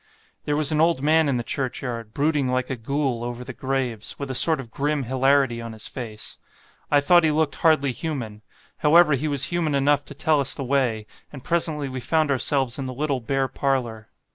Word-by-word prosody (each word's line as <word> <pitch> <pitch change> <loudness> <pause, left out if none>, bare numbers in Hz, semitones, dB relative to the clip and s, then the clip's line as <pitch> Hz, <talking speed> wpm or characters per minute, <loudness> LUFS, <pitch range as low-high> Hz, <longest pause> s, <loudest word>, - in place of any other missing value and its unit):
There 145 - 0
was 150 0 +2
an 155 0 +2
old 165 -4 +2
man 155 0 +3
in 130 - +1
the 120 - -2
churchyard, 120 -3 -4
brooding 145 +1 0
like 130 +1 -1
a - - -1
Ghoul 130 0 -2
over 120 +1 -5
the 130 +1 -8
graves, 130 -4 -3
with 140 -2 -5
a - - -3
sort 160 +4 +2
of 120 -4 -9
grim 145 +2 -1
hilarity 130 -1 +2
on 115 -1 -7
his 110 - -6
face. 110 -4 -8 0.5
I 145 - +5
thought 175 +4 +5
he 160 - +3
looked 155 -1 0
hardly 155 -4 +3
human; 125 -8 -5 0.4
however, 155 0 +5
he 140 +3 -1
was 140 -2 +1
human 160 -4 0
enough 145 +1 +2
to 145 - -10
tell 155 +1 +2
us 140 - 0
the 140 - -4
way; 125 -5 0 0.3
and 135 -4 -10
presently 160 -4 -1
we 130 -1 -5
found 155 +3 +1
ourselves 135 -1 0
in 135 - -3
the 130 - -6
little 140 -1 -1
bare 135 +3 -1
parlour. 125 -5 -2
135 Hz, 210 wpm, -23 LUFS, 125-150 Hz, 0.5 s, I